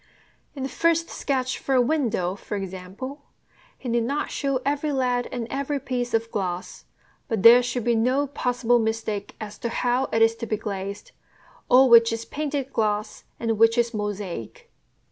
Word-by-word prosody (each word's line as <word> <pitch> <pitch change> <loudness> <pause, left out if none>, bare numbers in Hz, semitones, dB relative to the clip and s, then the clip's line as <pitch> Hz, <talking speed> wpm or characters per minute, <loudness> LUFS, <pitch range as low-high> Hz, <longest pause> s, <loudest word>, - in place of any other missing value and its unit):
In 270 - -5
the - - -1
first 335 +2 +1
sketch 260 -2 -2
for 270 - 0
a - - +5
window, 240 - +1
for 205 +1 -5
example, 195 +9 -7 0.6
he 260 - -9
need 235 0 +1
not 280 +5 -2
show 275 -2 -1
every 290 +2 0
lead 250 -2 0
and 240 -2 -3
every 280 +1 -2
piece 245 -2 -2
of 230 0 -1
glass; 180 -3 -4 0.4
but 225 -7 -2
there 235 +2 +9
should 245 -1 -2
be 240 +1 +2
no 255 +5 +2
possible 245 -3 +1
mistake 220 -2 -2
as 210 -1 -8
to 235 - -2
how 245 +2 0
it 225 -3 +2
is 225 0 +4
to 230 - -5
be 215 - -1
glazed, 200 -1 -6 0.6
or 260 +1 +7
which 230 -1 +7
is 225 0 -3
"painted" 285 -2 -3
glass 215 -1 -1
and 225 -2 -1
which 225 +1 +5
is 235 0 +1
"mosaic." 205 - -5
235 Hz, 175 wpm, -24 LUFS, 215-265 Hz, 0.6 s, there